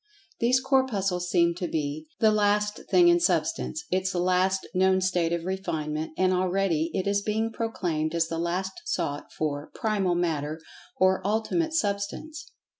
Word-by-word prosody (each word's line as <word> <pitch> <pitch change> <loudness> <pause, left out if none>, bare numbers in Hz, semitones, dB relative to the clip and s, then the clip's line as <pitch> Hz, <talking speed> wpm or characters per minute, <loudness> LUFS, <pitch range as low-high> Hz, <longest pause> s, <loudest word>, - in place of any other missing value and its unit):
These 250 +2 +3
Corpuscles 205 -10 +1
seem 170 -1 +3
to 180 - -2
be 155 0 -3
the 220 -1 +4
"last 210 0 +1
thing 355 -1 +6
in 345 0 +5
Substance"—its 195 - -1
last 185 +2 +1
known 190 +1 +3
state 180 -3 +1
of 170 -1 -2
refinement, 160 -5 -3
and 185 0 +3
already 180 -3 +1
it 190 - -1
is 200 0 +1
being 220 +2 -1
proclaimed 170 -9 -2
as 165 -1 +2
the 165 0 -3
long 170 +2 -1 0.2
sought 145 - -3
for 145 -1 -3
"Primal 200 -5 0
Matter," 160 -3 -1 0.4
or 185 0 +3
"Ultimate 225 - 0
Substance." 225 - -2
185 Hz, 145 wpm, -27 LUFS, 170-210 Hz, 0.4 s, thing